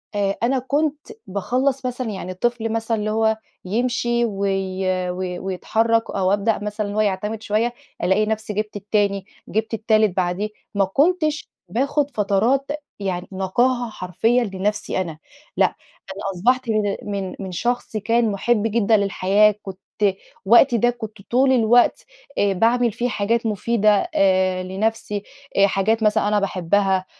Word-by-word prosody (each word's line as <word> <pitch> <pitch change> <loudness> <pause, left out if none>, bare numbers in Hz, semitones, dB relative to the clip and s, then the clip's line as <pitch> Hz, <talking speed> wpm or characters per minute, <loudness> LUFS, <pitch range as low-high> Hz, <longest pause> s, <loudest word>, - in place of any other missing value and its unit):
آآ 200 -1 +1
أنا 260 +2 +2
كنت 295 +3 -1 0.2
باخلّص 255 +8 -1
مثلًا، 250 -2 -3
يعني 185 -2 -5
الطفل 225 +3 -1
مثلًا 225 0 -1
اللي 215 0 -2
هو 220 0 +2 0.3
يمشي 240 +3 0
وي 195 -2 -2 0.2
و 180 0 -4
ويتحرك 225 +4 +1
أو 190 +1 +1
أبدأ 205 +2 +1
مثلًا 210 0 -3
هو 215 - +2
يعتمد 210 +2 -1
شوية، 225 +2 0 0.3
ألاقي 190 +4 +3
نفْسي 220 0 -3
جِبت 210 +1 -3
التاني، 200 -1 0 0.2
جِبت 220 +1 -2
التالت 215 -3 +2
بعديه، 185 +3 0 0.3
ما 200 -1 +3
كنتش 310 - +1 0.2
باخد 280 +4 0
فترات 230 +6 +1 0.3
يعني 185 -3 -3
نقاهة 240 +6 0
حرفيًا 220 +6 0
لنفْسي 195 0 -1
أنا، 165 -4 -5 0.4
لأ - - +5 0.5
أنا 200 - -7
أصبحْت 250 +7 +1
من 215 -2 +1
ال 200 - -1
من 195 -2 -3
من 190 -2 -5
شخص 240 +3 -2
كان 230 +1 +1
مُحب 210 +2 +1
جدًا 220 -1 +3
للحياة، 200 +1 +3
كنت 190 -2 -8 0.7
وقتي 235 +3 +6
ده 240 +3 +3
كنت 220 -4 -7
طُول 260 +2 +4
الوقت 240 -1 +3 0.3
آآ 200 -1 +2
باعمل 235 +4 +2
فيه 245 +4 -2
حاجات 230 +2 0
مفيدة 215 - +2
آآ، 185 -3 +2
لنفْسي، 205 +2 -2 0.3
آآ، 200 - +6
حاجات 215 +4 +1
مثلًا 210 -1 +2
أنا 210 0 +2
باحبها، 190 0 +1
215 Hz, 145 wpm, -22 LUFS, 195-235 Hz, 0.7 s, وقتي